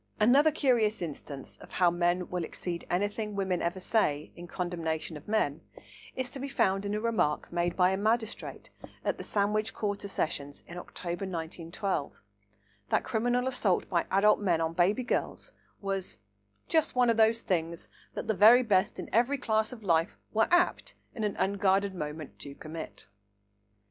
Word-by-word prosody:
Another 265 +8 +6
curious 240 -8 +2
instance 145 -4 -6
of - - -14
how 180 -2 +4
men 175 +1 +1
will 180 -1 -1
exceed 170 +1 -5
anything 205 +3 -1
women 190 -3 0
ever 175 +2 -1
say 155 -7 0
in 175 0 -9
condemnation 170 -3 -3
of 150 - -11
men 165 -8 0 0.5
is 260 0 -2
to 275 - -7
be 275 +1 -4
found 195 -6 +1
in 205 - -1
a - - 0
remark 220 -10 0
made 175 0 0
by 180 0 +5
a 190 - 0
magistrate 220 +2 -2 0.3
at - - 0
the - - -4
Sandwich 210 +1 0
Quarter 205 -1 -2
Sessions 145 -6 -3
in 175 +1 -8
October 175 +1 -5
1912, 170 -1 -3 0.8
that - - +2
criminal 245 +1 0
assault 230 -8 +1
by 170 -2 +1
adult 205 +2 +4
men 180 -5 +2
on 165 0 -1
baby 185 +8 +2
girls 245 - -2 0.3
was 195 -2 -2 0.5
"just 320 -4 +2
one 250 -2 +4
of 230 - 0
the 220 0 +6
things 170 -7 -2 0.3
that - - -4
the 220 - +2
very 225 +5 +7
best 195 -5 +2
people - - -5
in - - -18
every 245 +5 +3
class 220 -3 +1
of 235 -4 -10
life 165 -3 +2 0.2
were 220 0 +3
apt 350 0 +2 0.2
in 225 - -4
an 210 -2 0
unguarded 195 0 +2
moment 150 -3 -6
to 140 0 -8
commit." 155 -5 -8
195 Hz, 170 wpm, -30 LUFS, 170-220 Hz, 0.8 s, very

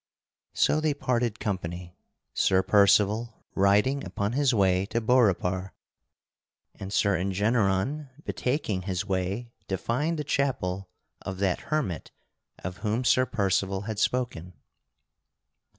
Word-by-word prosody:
So 155 - +3
they 155 -2 +1
parted 120 -5 -1
company, 90 -3 -4 0.4
Sir 95 -1 +3
Percival 105 +3 +3
riding 105 +8 +3
upon 100 +2 -2
his 140 +1 +2
way 95 -4 +2
to 115 - -1
Beaurepaire, 100 -6 +1 1.0
and 95 0 -8
Sir 100 -1 +2
Engeneron 100 - 0
betaking 125 -8 -1
his 95 -1 -2
way 100 +5 -2 0.2
to 95 - -1
find 145 - -1
the 150 - -2
chapel 100 -10 -1 0.3
of 95 -1 -5
that 95 -2 0
hermit 140 - -1 0.5
of 90 +1 -5
whom 110 +3 -1
Sir 130 +1 +3
Percival 95 -3 0
had 110 0 -4
spoken. 105 -9 -1
100 Hz, 120 wpm, -27 LUFS, 95-125 Hz, 1.0 s, So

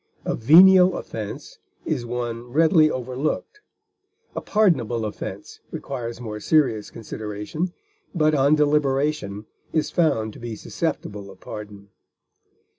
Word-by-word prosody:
A - - 0
venial 180 +8 +7
offense 105 -2 -7 0.3
is 120 -1 -2
one 120 0 -4
readily 155 +2 +5
overlooked; 130 - -3 0.7
a - - -3
pardonable 130 - +1
offense 105 - -7
requires 120 -3 -6
more 110 -3 -6
serious 120 -4 +1
consideration, 110 - -5 0.4
but 155 -2 +3
on 140 +1 +4
deliberation 145 -7 0 0.3
is 155 - 0
found 115 -11 +1
to - - -12
be 120 -2 -6
susceptible 100 -1 -4
of 95 -1 -14
pardon. 105 -1 -9
125 Hz, 115 wpm, -23 LUFS, 110-155 Hz, 0.7 s, venial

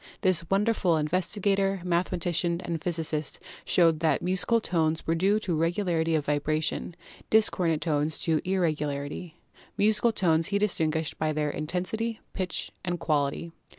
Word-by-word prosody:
This 170 -4 +4
wonderful 195 -4 +2
investigator, 195 +4 0
mathema 180 +1 0
tician 170 0 0
and 165 -3 -3
physicist 160 -3 0 0.2
showed 165 -3 +3
that 160 -1 +1
musical 190 +6 +1
tones 160 -6 -1
were 165 - +1
due 195 +5 +2
to 185 -5 -2
regularity 165 0 0
of 150 -2 -1
vibration, 155 +3 -1 0.3
discordant 180 -7 +3
tones 150 -1 0
to 160 -2 +1
irregularity. 155 -3 -2 0.4
Musical 215 +3 +3
tones 165 -6 +2
he 200 - 0
distinguished 160 -6 0
by 155 0 0
their 150 -1 -1
Intensity, 185 +9 -2
Pitch 185 -3 -3
and 175 -1 -3
Quality. 150 +2 -1
170 Hz, 135 wpm, -27 LUFS, 155-185 Hz, 0.4 s, This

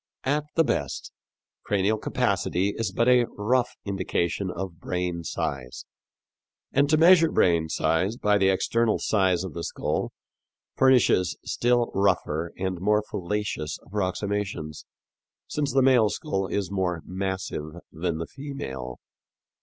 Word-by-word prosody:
"At 145 +3 0
the 165 - +5
best, - - -2 0.5
cranial 105 +2 +1
capacity 95 -2 0
is 115 - -2
but 115 - +1
a 125 -2 +5
rough 120 +4 +1
indication 95 -1 -1
of 90 -1 -6
brain 90 -2 -3
size; 65 -5 -4 0.9
and 140 +1 +3
to 155 - +4
measure 165 0 +6
brain 85 -2 +3
size 90 +8 0
by 105 -3 +2
the 95 -1 +4
external 110 +4 +2
size 95 -4 +1
of 95 - -6
the 85 - -5
skull - - -2 0.6
furnishes 125 -8 +4
still 120 0 +1
rougher 85 -4 +1
and 95 -1 -2
more 105 +2 +2
fallacious 90 -5 -3
approximations, 100 -4 -3 0.6
since 145 -2 -2
the 135 +1 +3
male 125 -5 +5
skull 95 -1 -2
is 100 -1 -2
more 90 -4 -1
massive 95 -5 -4 0.2
than 85 0 -2
the 80 - -3
female." 65 - -7
95 Hz, 130 wpm, -26 LUFS, 85-115 Hz, 0.9 s, measure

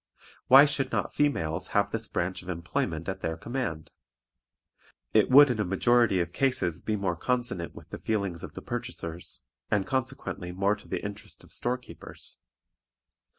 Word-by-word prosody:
Why 135 +3 +10
should 135 -2 0
not - - -1
females 90 - +1
have 100 - +2
this 115 -1 -3
branch 90 0 -2
of 90 - -11
employment 85 -2 -2
at 95 0 -3
their 80 0 -2
command? 100 - -4 1.2
It 110 -2 +5
would 140 +1 +9
in 115 - -2
a - - +3
majority 105 +2 +3
of 85 0 -2
cases 125 -11 0
be 110 - -1
more 95 -4 -1
consonant 120 -4 -2
with - - -13
the - - -6
feelings 100 -6 -1
of - - -7
the - - -8
purchasers, 120 -9 -5 0.3
and 100 -2 +2
consequently 130 -8 -3
more 100 +3 +1
to - - -16
the - - -3
interest 100 -1 -7
of - - -17
store 125 +1 -1
keepers. 125 - -8
100 Hz, 165 wpm, -28 LUFS, 85-125 Hz, 1.2 s, Why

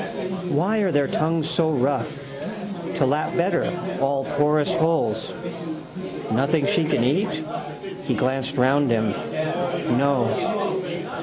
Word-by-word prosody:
Why 185 +9 +2
are 195 -3 +2
their 145 -2 +3
tongues 160 +1 +1
so 160 -2 +2
rough? 140 0 0 0.7
To 140 - +3
lap 150 +4 +1
better, 175 0 +2 0.3
all 135 0 +1
porous 150 0 +3
holes. 160 -10 +1 1.0
Nothing 140 +6 +2
she 200 -5 +3
can 150 - +2
eat? 155 - +1 0.6
He 130 - +1
glanced 130 +4 0
round 135 +2 +4
him. 110 -2 +2 0.9
No. 175 - 0
145 Hz, 110 wpm, -24 LUFS, 135-170 Hz, 1.0 s, round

